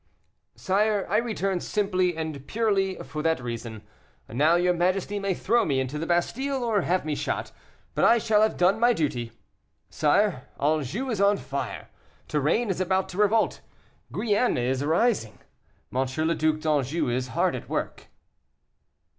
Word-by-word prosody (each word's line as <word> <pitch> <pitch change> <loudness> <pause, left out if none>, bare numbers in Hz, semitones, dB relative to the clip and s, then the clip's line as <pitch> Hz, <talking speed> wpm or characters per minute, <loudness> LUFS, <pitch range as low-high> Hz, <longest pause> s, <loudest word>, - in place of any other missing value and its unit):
"Sire, 205 +1 +1
I 210 - +4
return 200 -5 -1
simply 185 -4 0
and 155 -4 -5
purely 200 -4 +1
for 150 +3 -5
that 160 -1 +1
reason. 115 -3 -6 0.4
Now, 150 +9 +3
your 180 +1 +3
majesty 185 +3 0
may 195 -2 -1
throw 235 +7 +2
me 135 -3 0
into 130 +3 -3
the 165 - -3
Bastile, 260 +10 0
or 220 -4 +1
have 180 -1 0
me 155 - -1
shot, - - -3 0.4
but - - 0
I 235 - +6
shall 215 -2 +2
have 220 - +2
done 180 +4 +3
my 240 +1 +4
duty. 125 - -2 0.6
Sire, 155 -1 +1
Anjou 155 - 0
is 210 -3 -1
on 200 0 +4
fire; 135 +2 -5 0.4
Touraine 155 - +1
is 185 - -2
about 190 +1 0
to 180 - -8
revolt; 210 +1 +2 0.5
Guienne 220 +3 +1
is 130 +2 0
rising. 160 - +1 0.6
M. 130 +1 +1 0.2
le 165 - +2
Duc 155 -1 +1
d'Anjou 150 0 0
is 125 +1 -1
hard 115 - 0
at - - -8
work." - - -4
175 Hz, 155 wpm, -26 LUFS, 145-210 Hz, 0.6 s, I